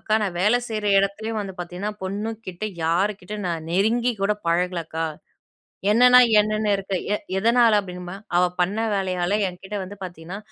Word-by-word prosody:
"அக்கா 215 - 0
நான் 185 -4 -2
வேலை 215 +6 +4
செய்யிற 215 -2 -3
இடத்துலேயே 215 +3 -2
வந்து 195 -2 -6
பார்த்தீங்கன்னா, 180 +4 -4
பொண்ணு 205 +4 -3 0.2
கிட்ட 180 +3 -5 0.2
யாருகிட்டயும் 195 +3 -1
நான் 165 -2 -3
நெருங்கி 230 +6 +2
கூட 205 +1 +3 0.2
பழகல 175 0 +1
அக்கா. 160 0 -3 0.9
என்னன்னா, 250 +3 +7 0.2
என்னன்னு 215 0 0
இருக்கேன்". 195 -2 -3
"எ - - +1 0.2
எதனால?" 230 0 +4
அப்படின்னுமா, 180 -1 -8 0.2
"அவ 180 - +5 0.2
பண்ண 195 +5 0 0.2
வேலையால 185 +1 0
என்கிட்ட 190 +3 -7
வந்து 200 +2 -9
பார்த்தீங்கன்னா, 175 +1 -7
195 Hz, 155 wpm, -23 LUFS, 180-215 Hz, 0.9 s, என்னன்னா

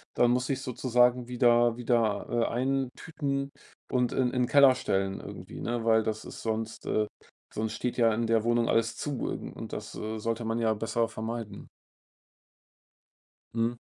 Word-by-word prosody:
Dann 120 0 +4
muss 125 0 +1
ich 135 -1 -1
sozusagen 125 -1 +2
wieder 120 -1 +4
wieder, 115 -3 +1
äh, 120 -1 +1
eintüten 135 +2 -2 0.4
und 125 -1 +1
in 125 -2 +1
in 125 -1 +1
Keller 140 -1 +7
stellen 95 -3 -1
irgendwie, - - -9
ne, 120 -1 -2
weil 110 0 +4
das 110 0 -3
ist - - -9
sonst, 110 0 -3
äh 105 0 +1 0.5
sonst 110 0 -2
steht 125 +1 -3
ja 115 -2 +4
in 115 +2 0
der 115 -1 +2
Wohnung 120 0 +2
alles 115 0 +2
zu 145 -4 -3
und - - -6
das, - - -6
äh, 110 +1 -4
sollte 115 +2 -2
man 115 +1 -1
ja 110 -1 +2
besser 115 +2 0
vermeiden. 110 -2 -6 1.9
Mhm. 115 +1 0
120 Hz, 160 wpm, -29 LUFS, 110-125 Hz, 1.9 s, Keller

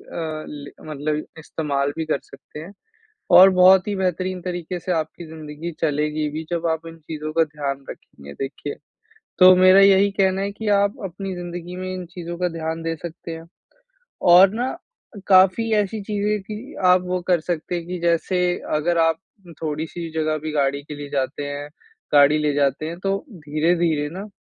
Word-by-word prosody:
अ, 155 -2 -6
ल 145 -1 -8 0.2
मतलब 150 +1 -2
इस्तेमाल 145 -3 -2
भी 160 - -2
कर 155 - 0
सकते 150 - -12
हैं। 170 +5 -10 0.7
और 190 +1 +10
बहुत 185 +1 +6
ही 205 - -1
बेहतरीन 185 0 -2
तरीके 175 0 -4
से 180 - -4
आपकी 160 0 -3
ज़िंदगी 155 +1 -7
चलेगी 150 0 0
भी 155 +2 -4
जब 170 -1 -1
आप 160 +1 -3
इन 165 - -10
चीज़ों 155 -1 -6
का 165 - +4
ध्यान 145 -3 -4
रखेंगे 70 0 -11
देखिए। 135 - -5 0.6
तो 185 0 +9
मेरा 185 +1 +7
यही 195 0 +6
कहना 190 0 +2
है 200 0 -2
कि 215 +1 -5
आप 200 +1 +2
अपनी 190 +1 -5
ज़िंदगी 175 0 -7
में 185 0 -4
इन 185 -1 -5
चीज़ों 175 -1 -6
का 180 0 +1
ध्यान 165 0 -4
दे 165 0 -2
सकते 170 +1 -8
हैं, 165 0 -8 0.8
और 180 +2 +7
ना 245 +4 -1 0.6
काफ़ी 195 +4 +5
ऐसी 210 +1 0
चीज़ें 210 0 -1
थी, 215 +7 -8
आप 180 0 +5
वो 180 0 -2
कर 180 -2 +3
सकते 170 +1 -3
हैं 170 -1 -4
कि 180 -1 -4
जैसे 170 +2 +1 0.3
अगर 170 +3 +1
आप 165 -1 +2 0.4
थोड़ी-सी 160 +2 -4
जगह 155 0 0
भी 155 +1 -5
गाड़ी 140 -1 0
के 150 +1 -8
लिए 145 0 -8
जाते 140 0 -2
हैं 145 +1 -6 0.4
गाड़ी 145 +1 +6
ले 150 -1 0
जाते 140 +1 +1
हैं 170 +2 -6
तो 195 +1 0
धीरे-धीरे 155 -2 0
ना 195 +3 -6
165 Hz, 180 wpm, -22 LUFS, 150-185 Hz, 0.8 s, और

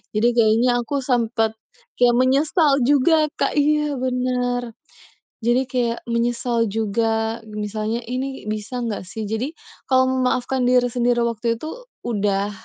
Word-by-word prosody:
Jadi 225 +3 +3
kayaknya 235 +2 +3
aku 275 +3 -2
sempet 230 -3 +1 0.5
kayak 240 -1 +5
menyesal 280 +5 +3 0.2
juga, 305 +3 +4
Kak. 275 - 0
Iya, 300 -1 +1
bener. 250 -1 -1 0.7
Jadi 240 +2 +2
kayak 235 -2 -1
menyesal 235 0 0
juga, 225 +2 -1
misalnya, 215 +2 -3
"Ini 260 +3 -4
bisa 215 +4 -4
nggak 215 -5 -4
sih?". 220 +5 -6
Jadi 225 +8 -3 0.3
kalau 260 -1 +3
memaafkan 255 0 0
diri 250 -1 +3
sendiri 240 0 +1
waktu 230 0 0
itu 320 - -8 0.2
udah, 205 -3 0
240 Hz, 130 wpm, -21 LUFS, 225-255 Hz, 0.7 s, kayak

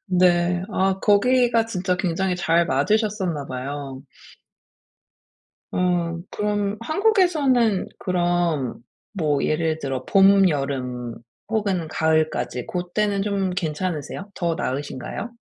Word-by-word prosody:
네. 180 -1 +3
아 190 0 +1
거기가 235 +3 +3
진짜 185 -4 -1
굉장히 185 0 -1
잘 170 -2 +2
맞으셨었나 185 - 0
봐요. 135 +1 -6 1.7
음. 175 -2 0
그럼 205 0 -1
한국에서는 305 - +2
그럼 175 -7 0 0.3
뭐 155 -7 0
예를 160 0 0
들어 135 -3 -4
봄, 195 0 +6
여름 125 -5 -3 0.3
혹은 200 -7 0
가을까지 155 -5 0
고때는 195 +3 -1
좀 200 -2 0
괜찮으세요? 180 +1 -3
더 170 -2 -1
나으신가요? 145 - -4
180 Hz, 220 characters per minute, -23 LUFS, 155-200 Hz, 1.7 s, 봄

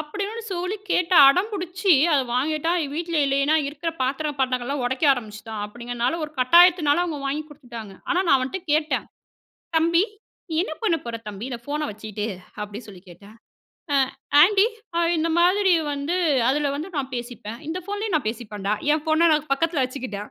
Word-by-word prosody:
அப்படின்னு 405 +9 -5
சொல்லி 365 +3 -2
கேட்டு 360 0 +2
அடம்பிடிச்சு 370 +2 +2 0.2
அத 285 - +4
வாங்கிட்டான். 310 +6 0
வீட்ல 335 +1 -3
இல்லன்னா 280 +3 +2
இருக்குற 330 +3 -4
பாத்திரம் 285 +2 -2
பண்டங்கள்லாம் 255 +1 -1
உடைக்க 260 +5 -1
ஆரம்பிச்சுட்டான் 215 -3 -6
அப்படிங்குறதுனால, 240 +5 -3
ஒரு 300 - -9
கட்டாயத்துனால 340 +3 +5
அவங்க 320 -4 -4
வாங்கி 295 +3 -2
குடுத்துட்டாங்க. 235 -8 -10 0.2
ஆனா 355 - +2
நான் 275 - +6
அவன்ட்ட 270 +9 -3
கேட்டேன், 305 +1 0 0.7
"தம்பி 335 +3 +3 0.5
நீ 320 - -3
என்ன 315 - -5
பண்ண 345 -7 +3
போற 235 -1 -4
தம்பி, 210 +3 -7
இந்த 235 - -5
ஃபோனை 300 +1 -2
வச்சிட்டு?" 210 0 -5 0.4
அப்படி 210 +3 -8
சொல்லி 190 -4 -12
கேட்டேன், 200 +5 -15 0.6
ஆ - - +4 0.5
ஆண்டி 405 +3 +5 0.5
இந்த 320 +1 0
மாதிரி 375 +2 +4 0.2
வந்து 285 +5 -2 0.3
அதுல 290 +1 0
வந்து 315 +6 -5
நான் 265 -1 -4
பேசிப்பேன். 235 -2 -7
இந்த 330 +3 -3
ஃபோன்லேயும் 410 -3 -1
நான் 260 -8 -1
பேசிப்பேண்டா. 210 -3 -5 0.2
என் 305 0 0
ஃபோன்ன 320 +2 +3
நான் 300 -1 -2
பக்கத்தில 330 0 0
வச்சுக்கிட்டேன். 250 -6 -6
295 Hz, 155 wpm, -23 LUFS, 240-340 Hz, 0.7 s, நான்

